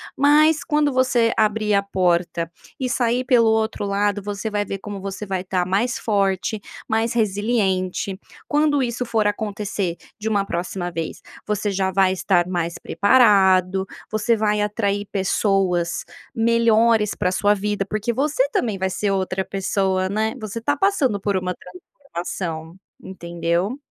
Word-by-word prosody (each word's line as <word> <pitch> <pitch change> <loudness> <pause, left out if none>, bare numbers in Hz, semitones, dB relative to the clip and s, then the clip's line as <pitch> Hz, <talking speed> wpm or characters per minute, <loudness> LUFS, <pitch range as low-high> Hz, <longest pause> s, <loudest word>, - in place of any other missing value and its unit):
mas 300 +3 +4
quando 295 -2 +1
você 255 -3 +2
abrir 215 0 +1
a 200 - +4
porta 175 -3 0 0.3
e 260 - -1
sair 245 0 +1
pelo 235 -3 +4
outro 220 -1 0
lado, 205 0 0
você 205 +2 -4
vai 205 0 0
ver 195 -1 -5
como 200 0 -7
você 195 +2 -5
vai 190 -2 -3
tá 185 -1 -1
mais 205 +7 0
forte, 200 0 0 0.3
mais 225 0 +1
resiliente. 200 -4 0 0.3
Quando 295 -2 +2
isso 245 0 -2
for 225 -3 0
acontecer 205 -3 -2 0.2
de 215 +1 -2
uma 200 -2 +1
próxima 175 0 -3
vez, 165 -1 -5 0.2
você 210 0 -1
já 190 -1 0
vai 190 0 +3
estar 180 -2 +1
mais 170 -1 -2
preparado, 195 -4 +3 0.2
você 215 +2 +2
vai 210 -1 +1
atrair 205 -1 -1
pessoas 190 -3 0 0.3
melhores 230 -1 +3
para 180 - 0
a - - -3
sua 205 +2 +2
vida, 205 0 -1
porque 215 +3 -1
você 300 - +1
também 395 - 0
vai 190 0 -1
ser 200 +2 -1
outra 190 0 -1
pessoa, 190 -1 0
né. 220 +2 0
Você 215 +1 -5
tá 285 +5 +1
passando 285 - +1
por 200 0 -1
uma 180 -1 -2
transformação, 175 - -7 0.3
entendeu? 175 +5 -2
205 Hz, 150 wpm, -22 LUFS, 190-230 Hz, 0.3 s, mas